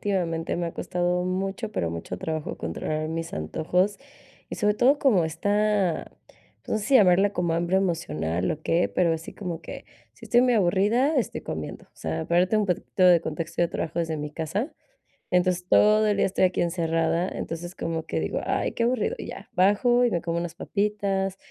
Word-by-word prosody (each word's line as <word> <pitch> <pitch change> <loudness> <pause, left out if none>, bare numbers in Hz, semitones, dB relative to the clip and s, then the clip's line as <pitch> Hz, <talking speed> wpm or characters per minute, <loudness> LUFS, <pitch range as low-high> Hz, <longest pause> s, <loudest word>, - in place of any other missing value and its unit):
últimamente, 170 -5 -1
me 170 0 -1
ha 165 - -5
costado 180 0 -1
mucho, 195 +4 -2
pero 85 - -1
mucho 85 +2 -5
trabajo 160 -1 -4
controlar 155 - -3
mis 165 +1 -4
antojos 180 - 0 0.5
y, - - -4
sobre 210 -2 +2
todo, 260 +6 +4
como 215 - +3
esta, 205 +2 0 0.5
pues, - - -28
no 220 - +2
sé 210 - -5
si 275 - +2
llamarla 195 -1 +5
como 175 -3 0
hambre 175 +3 +1
emocional 85 - -1
o 155 - -3
qué, 170 +2 +2
pero 170 -2 +2
así 160 0 -5
como 175 -5 -5
que, - - -8 0.3
si - - -13
estoy 240 - +4
muy 250 -1 +3
aburrida, 210 - +2
estoy 245 -7 -1
comiendo. 80 -1 -6
O - - -31
sea, 80 0 -4
para 170 +1 +3
darte 185 +4 +2
un 210 -1 +1
poquitito 185 +1 0
de 175 -2 +7
contexto, 165 +1 -3
yo 170 - +1
trabajo 165 +1 -2
desde 160 -1 -2
mi 150 0 -5
casa, 180 - -3 0.6
entonces, 180 0 +1
todo 215 +1 +5
el 210 - +1
día - - +3
estoy 190 0 +2
aquí 180 - 0
encerrada, 165 0 0
entonces, 175 +2 -6
como 165 -1 -3
que - - -2
digo: - - -2
"Ay, - - 0
qué 230 - -1
aburrido", 255 - 0
y - - -6
ya, - - -9
bajo 225 +7 +4
y - - +3
me 170 - 0
como 170 0 -2
unas 170 -1 -5
papitas, 200 -1 -1
180 Hz, 200 wpm, -25 LUFS, 165-205 Hz, 0.6 s, de